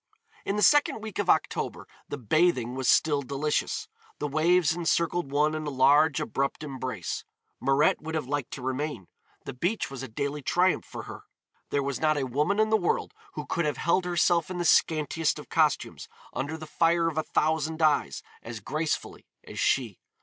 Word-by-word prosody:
In 200 - -1
the 210 - +1
second 295 -6 +4
week 220 -2 -7
of 200 -3 -1
October 160 - 0 0.2
the 145 - -4
bathing 130 - +1
was 130 0 -1
still 145 -3 +3
delicious. 140 +3 -2 0.3
The 150 - -2
waves 160 +2 +3
encircled 170 -2 0
one 150 +2 +2
in 155 -1 -4
a - - 0
large, 145 +2 +4
abrupt 140 +3 -2
embrace. 130 - -4 0.4
Mirette 135 +3 +2
would 160 +1 -5
have 155 - -1
liked 145 -1 -3
to 135 - -7
remain, 130 - -3 0.4
the - - -5
beach 175 - -2
was 135 -2 -7
a 135 - -5
daily 140 +5 -3
triumph 180 +6 +1
for - - -8
her. - - -10 0.4
There 140 - 0
was 140 0 -3
not 155 -1 +2
a 135 - 0
woman 150 - 0
in 215 0 +2
the 220 - +5
world 175 -5 -1 0.2
who 150 - -5
could 170 - -1
have 150 - -1
held 175 +2 +1
herself 175 -1 +2
in 185 - -4
the 175 - -2
scantiest 160 0 +2
of - - -10
costumes, - - 0 0.3
under 160 +2 -3
the 155 - -8
fire 165 +2 +2
of 160 -1 -1
a - - 0
thousand 160 +1 0
eyes, 155 -1 +1 0.2
as 115 -1 -7
gracefully 155 +9 -3 0.2
as - - -9
she. 115 -8 +1
155 Hz, 185 wpm, -27 LUFS, 135-170 Hz, 0.4 s, the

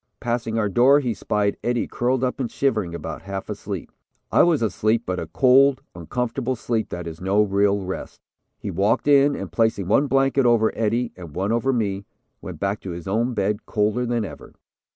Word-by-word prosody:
Passing 115 -2 -2
our 110 -2 +1
door, 125 +7 +5
he 125 -5 -1
spied 105 -1 -1
Eddie 120 0 0
curled 125 +1 -1
up 125 0 -1
and 125 -3 -2
shivering, 110 -11 -1
about 80 -1 -6
half 95 0 -6
asleep. - - -6 0.4
I - - +5
was 165 -8 +3
asleep, 110 +2 +1
but 90 0 -2
a - - -5
cold, 135 +1 +4
uncomfortable 125 - -3
sleep 115 -1 -2
that 90 -1 -5
is 80 0 -8
no 100 +3 +3
real 100 0 +1
rest. 95 - -6 0.4
He 100 - -5
walked 100 - +1
in, 145 0 +5
and - - -6
placing 110 -5 +1
one 145 - +3
blanket 135 -1 +2
over 115 -2 +3
Eddie 115 +2 0
and 85 -5 -11
one 95 +4 -1
over 120 +3 +1
me, 100 -5 -1 0.4
went - - -8
back 100 +1 -1
to 95 - -7
his 85 0 -7
own 115 +5 0
bed 105 +1 -1
colder 110 +3 0
than 120 -2 0
ever. - - -11
110 Hz, 195 wpm, -23 LUFS, 100-125 Hz, 0.4 s, door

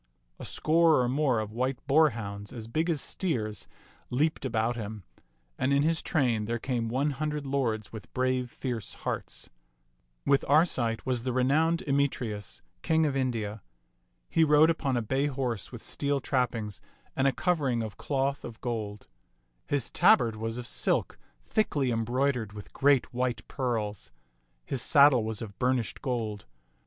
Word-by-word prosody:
A - - -7
score 160 -1 +3
or - - +1
more 130 -2 +2
of 105 -1 -4
white 130 +2 -1
boarhounds 115 -9 +1
as 115 -4 -7
big 160 +9 0
as 160 -4 +1
steers 115 - -2 0.4
leaped 150 +3 0
about 115 -1 0
him, 105 -3 -6 0.6
and 130 - +1
in 140 +1 +4
his 160 +1 +1
train 120 -8 +1
there 120 +2 -1
came 120 -2 -2
one 135 +5 +1
hundred 150 +1 -3
lords 120 -7 -1
with 110 - -9
brave, 130 -1 0
fierce 120 -5 -4
hearts. - - -4 0.7
With 140 -1 +3
Arcite 135 -7 +2
was 125 -2 0
the 130 +1 -2
renowned 155 +7 +2
Emetreus, 130 -8 -1 0.2
king 160 0 +2
of 145 -3 0
India. 115 -5 -2 0.7
He 165 - +3
rode 155 +1 +6
upon 135 -5 -1
a 120 - 0
bay 135 +6 +1
horse 125 -8 -3
with 120 -3 -8
steel 140 -1 0
trappings 120 -6 -1 0.3
and 135 - +2
a - - +4
covering 135 -7 0
of 110 -3 -7
cloth 140 0 -1
of 115 -2 -8
gold. 110 -4 -4 0.6
His 140 -4 -1
tabard 115 -3 +4
was 115 +1 -4
of 125 - -5
silk, - - 0 0.3
thickly 145 - +1
embroidered 120 -1 0
with 105 -1 -10
great 140 -3 +3
white 125 0 -2
pearls. 115 -7 -2 0.5
His 135 - -2
sad 145 +3 +7
dle 125 -4 +2
was 110 +1 -3
of 100 -3 -10
burnished 125 -3 0
gold. 110 - -3
125 Hz, 155 wpm, -29 LUFS, 115-140 Hz, 0.7 s, sad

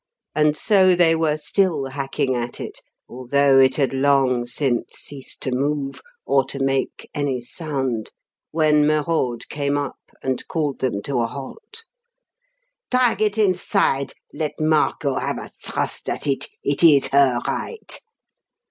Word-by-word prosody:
And 150 0 +2
so 190 -4 +4
they 170 -2 +4
were 160 -2 +1
still 165 -1 +1
hacking 135 0 -1
at 120 -1 -4
it - - -7 0.3
although 135 +2 +3
it 130 0 +5
had 135 -2 +1
long 135 -3 +2
since 125 -2 -1
ceased 140 -2 -5
to 130 - -1
move, 140 +1 -1 0.2
or 135 -1 +3
to - - -4
make 135 -1 -1
any 145 -4 -1
sound 135 -6 -3 0.4
when 150 -2 +3
Merode 150 -5 0
came 145 -1 -1
up 145 -2 -4 0.2
and 130 -1 -2
called 150 -4 -2
them 110 -6 -1
to 135 -3 -1
a 115 - +1
halt. 445 - -9 1.1
"Drag 250 -5 +2
it 210 0 +1
inside; 185 -8 +1 0.2
let 155 -1 -3
Margot 155 -3 +1
have - - -2
a - - -7
thrust - - -4
at - - -3
it 140 -2 0 0.2
it 140 0 0
is 150 -5 +6
her 135 -3 +4
right. 460 - -4
140 Hz, 145 wpm, -22 LUFS, 135-155 Hz, 1.1 s, is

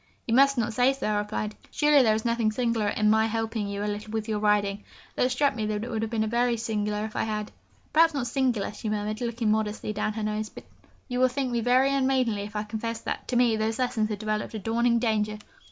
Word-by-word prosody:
'You 225 - -1
must 275 +2 +5
not 225 -1 0
say 250 +4 +3
so,' 270 - -5
I 210 -1 +1
replied. 210 0 -2 0.2
'Surely 295 -1 +4
there 220 -4 +4
is 220 - -3
nothing 230 -2 +1
singular 230 -2 0
in 210 +1 +2
my 220 0 +3
helping 225 -1 -2
you 200 0 -3
a - - -1
little 210 +1 -4
with 220 0 -3
your 215 -1 -1
riding?' 205 -1 +1 0.3
Though - - +2
it - - +2
struck 275 +3 +2
me 215 -2 -2
that 210 0 -2
it 245 - -5
would 220 -1 -2
have 225 - -2
been 220 -1 0
very 240 +1 +1
singular 210 -2 -2
if 215 - -8
I - - 0
had. 215 -1 -3 0.4
'Perhaps 325 0 +5
not 270 -3 -1
singular,' 245 -5 0
she 215 - -5
murmured, 215 +1 -2
looking 235 -2 0
modestly 215 0 -1
down 210 0 -1
her 220 0 -4
nose; 215 0 -2
'but - - -11 0.4
will 250 -1 -2
you 255 - +6
think 255 0 -2
me 235 -1 0
very 255 +3 +3
unmaidenly 260 -6 +1
if 210 +1 -8
I 210 - -1
confess 225 +2 -4
that, - - -4
to 250 - -2
me, 240 -2 +4
those 220 +1 -1
lessons 225 -4 0
have 210 - -2
developed 215 +1 -3
a - - -3
dawning 235 +3 +1
danger?' 215 -2 0
220 Hz, 250 wpm, -27 LUFS, 210-245 Hz, 0.4 s, you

